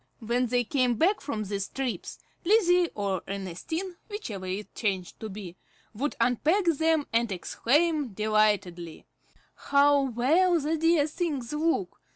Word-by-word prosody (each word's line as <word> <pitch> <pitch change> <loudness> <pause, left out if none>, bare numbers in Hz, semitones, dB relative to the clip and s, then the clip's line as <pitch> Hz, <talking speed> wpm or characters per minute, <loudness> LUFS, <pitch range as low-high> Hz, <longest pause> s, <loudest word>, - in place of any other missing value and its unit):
When 240 +3 0
they 245 +1 +1
came 250 0 +1
back 370 - +2
from 220 -7 -3
these 200 -1 -3
trips, 265 -3 -4 0.3
Lizzie 360 -3 +4
or 195 -3 -1
Ernestine, 200 - -5
whichever 220 - -6
it 195 +2 -5
chanced 190 -5 -3
to 220 - -6
be, 190 -3 -8 0.4
would 275 +7 -2
unpack 300 - +2
them, 320 -2 +2
and 230 -1 +2
exclaim 295 - +1
delightedly, 205 -6 0 0.5
"How 285 0 +3
well 295 +8 +2
the 305 +2 -1
dear 325 -1 +3
things 300 -6 -3
look! 300 - -1
250 Hz, 135 wpm, -27 LUFS, 210-320 Hz, 0.5 s, Lizzie